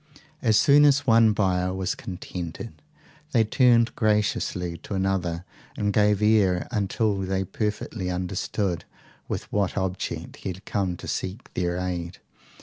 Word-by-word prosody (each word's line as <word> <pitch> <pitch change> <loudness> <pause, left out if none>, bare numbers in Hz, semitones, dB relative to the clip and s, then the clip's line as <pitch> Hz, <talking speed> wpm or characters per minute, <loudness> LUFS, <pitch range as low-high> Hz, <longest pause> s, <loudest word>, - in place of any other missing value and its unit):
As 110 -3 +4
soon 145 +1 +6
as 145 -1 +4
one 115 -2 +6
buyer 90 -3 +1
was 95 -1 -1
contented 90 +2 -7 0.6
they 115 -3 +5
turned 120 +1 +3
graciously 105 -5 0
to 100 - -6
another, 95 -3 -1 0.3
and 100 -1 0
gave 105 0 +3
ear 100 -5 +3
until 105 -1 0
they 95 0 -1
perfectly 105 -1 -3
understood 90 0 -2 0.4
with - - -3
what 100 -2 0
object 95 -1 -3
he - - -5
had 95 +1 -8
come 95 -4 -1
to - - -9
seek 95 +7 -4
their 90 0 -1
aid. 90 -1 -3
95 Hz, 140 wpm, -25 LUFS, 90-110 Hz, 0.6 s, soon